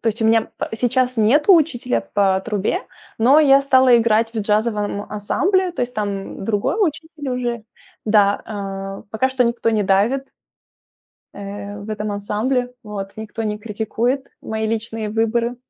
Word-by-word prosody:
то 230 Hz, -, 0 dB
есть 225 Hz, +2 st, -3 dB
у 220 Hz, -, +2 dB
меня 225 Hz, 0 st, +3 dB
п -, -, -3 dB
сейчас 250 Hz, +2 st, +1 dB
нету 285 Hz, -, +5 dB
учителя 275 Hz, -7 st, +1 dB
по 195 Hz, -2 st, +3 dB
трубе, 210 Hz, -, -1 dB, 0.4 s
но 260 Hz, +7 st, +6 dB
я 275 Hz, -2 st, +6 dB
стала 260 Hz, -3 st, +5 dB
играть 225 Hz, 0 st, +2 dB
в 220 Hz, -, -1 dB
джазовом 210 Hz, -1 st, 0 dB
ансамбле, 360 Hz, -, 0 dB
то -, -, -5 dB
есть 245 Hz, 0 st, -2 dB
там 200 Hz, -2 st, -4 dB
другой 205 Hz, -, 0 dB
учитель 320 Hz, -5 st, -2 dB
уже. 240 Hz, -3 st, -3 dB, 0.4 s
Да, 205 Hz, -2 st, +3 dB
а, 195 Hz, -2 st, -6 dB
пока 260 Hz, +4 st, +1 dB
что 260 Hz, -1 st, +2 dB
никто 235 Hz, -1 st, 0 dB
не 215 Hz, -2 st, +1 dB
давит 215 Hz, +8 st, +1 dB, 1.1 s
э, 205 Hz, 0 st, -7 dB
в 205 Hz, -, -9 dB
этом 210 Hz, -1 st, -3 dB
ансамбле. 245 Hz, +5 st, -1 dB
Вот. 200 Hz, -2 st, -6 dB
Никто 220 Hz, +1 st, -5 dB
не 210 Hz, -1 st, -2 dB
критикует 230 Hz, +5 st, -2 dB
мои 220 Hz, 0 st, -3 dB
личные 225 Hz, -1 st, -3 dB
выборы. 230 Hz, +2 st, 0 dB
225 Hz, 155 wpm, -20 LUFS, 210-250 Hz, 1.1 s, но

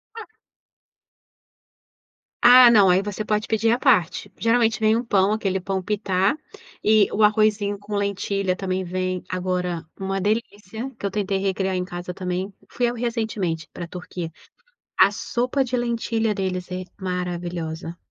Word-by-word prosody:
Ah. 450 Hz, -, -7 dB, 2.2 s
Ah, 245 Hz, 0 st, +9 dB
não. 205 Hz, -5 st, +6 dB
Aí 180 Hz, +1 st, +4 dB
você 205 Hz, +1 st, -4 dB
pode 210 Hz, 0 st, 0 dB
pedir 225 Hz, 0 st, +2 dB
à 240 Hz, -, +2 dB
parte. 230 Hz, -, +2 dB
Geralmente 230 Hz, -1 st, +2 dB
vem 220 Hz, 0 st, +3 dB
um 235 Hz, -, 0 dB
pão 200 Hz, -4 st, +2 dB
aquele 195 Hz, -3 st, -1 dB
pão 190 Hz, +1 st, -2 dB
pitá, 195 Hz, +4 st, 0 dB, 0.5 s
e 215 Hz, -1 st, +4 dB
o 215 Hz, -, +1 dB
arrozinho 210 Hz, -1 st, +3 dB
com 205 Hz, +1 st, -6 dB
lentilha 200 Hz, -1 st, -1 dB
também 185 Hz, 0 st, -2 dB
vem 185 Hz, 0 st, -3 dB
agora 180 Hz, -2 st, -2 dB, 0.2 s
uma 195 Hz, 0 st, -2 dB
delícia, 215 Hz, +2 st, -3 dB
que -, -, -5 dB
eu 200 Hz, -, -1 dB
tentei 200 Hz, -2 st, -1 dB
recriar 190 Hz, -1 st, -1 dB
em 180 Hz, -, -1 dB
casa 180 Hz, -1 st, -6 dB
também. 185 Hz, +2 st, -3 dB, 0.2 s
Fui 245 Hz, -, -1 dB
eu, -, -, -4 dB
recentemente, 220 Hz, -9 st, -2 dB
pra 175 Hz, -, -6 dB
Turquia. 175 Hz, -1 st, -7 dB, 0.7 s
A -, -, +7 dB
sopa 250 Hz, +3 st, -1 dB
de 250 Hz, 0 st, -2 dB
lentilha 230 Hz, -2 st, 0 dB
deles 185 Hz, -2 st, -3 dB
é 185 Hz, 0 st, -3 dB, 0.2 s
maravilhosa. 175 Hz, -3 st, -4 dB
200 Hz, 150 wpm, -23 LUFS, 185-220 Hz, 2.2 s, Ah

